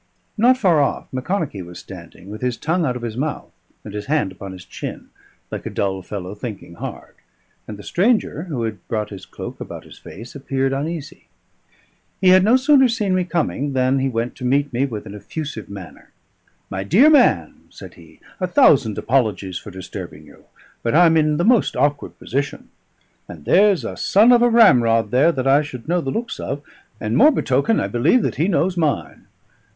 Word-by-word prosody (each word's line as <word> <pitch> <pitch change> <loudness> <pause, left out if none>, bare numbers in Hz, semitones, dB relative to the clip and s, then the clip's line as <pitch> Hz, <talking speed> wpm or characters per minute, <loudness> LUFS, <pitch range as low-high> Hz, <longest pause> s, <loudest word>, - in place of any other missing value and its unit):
Not 245 +4 +4
far 180 - +3
off 140 - -1
Macconochie 135 - -3
was 90 0 -10
standing, 95 +3 -12
with 110 - -8
his 125 -2 -1
tongue 170 +2 0
out 125 - -1
of 125 - -7
his 115 -2 -4
mouth 145 +4 -4 0.3
and 105 - -9
his 105 0 -6
hand 150 -10 0
upon 95 +1 -9
his 95 -1 -11
chin, - - -8 0.4
like - - -5
a - - -3
dull 95 -1 -2
fellow 95 0 -6
thinking 105 -5 -8
hard, - - -8 0.5
and 105 - -7
the 100 - -11
stranger, 185 - 0
who 140 -10 -4
had 110 -2 -4
brought 105 -2 -3
his 100 - -10
cloak - - -8
about - - -8
his - - -15
face, 115 +5 -11
appeared 135 -1 -2
uneasy. 155 +3 -5 0.9
He 185 - +4
had 185 0 +6
no 225 +5 +5
sooner 265 0 +5
seen 215 -5 -1
me 185 -1 +1
coming 150 -5 -2
than 130 +1 +2
he 135 0 0
went 115 0 -2
to 125 - -9
meet 140 +2 +1
me 130 +4 +1
with 110 -5 -7
an 100 - -9
effusive 110 - -7
manner. 100 -4 -11 0.6
"My 95 0 -3
dear 195 - +5
man," 295 - +3
said - - -12
he, - - -18 0.2
"a 185 - -1
thousand 140 - +4
apologies 105 -8 0
for - - -11
disturbing 95 -1 -9
you, - - -19 0.4
but 115 - -1
I'm 165 -1 +6
in 155 -1 +2
the 170 - 0
most 240 -1 +3
awkward 145 0 -1
position. 140 +2 -4 0.6
And 80 -4 -11
there's 200 -2 +4
a - - -5
son 215 +5 +4
of 240 -1 +5
a 240 - +5
ramrod 120 - +4
there 135 +7 +4
that 130 -5 -3
I 135 +2 +5
should 130 -4 -8
know 175 +1 +1
the 135 - -4
looks 235 - -4
of, 140 +2 -5 0.4
and 110 +1 -2
more, 230 - +7
betoken, 145 - +1
I - - -1
believe 155 - +2
that - - -2
he 160 - +1
knows 185 -1 +1
mine. 160 -4 -2
140 Hz, 195 wpm, -20 LUFS, 110-180 Hz, 0.9 s, more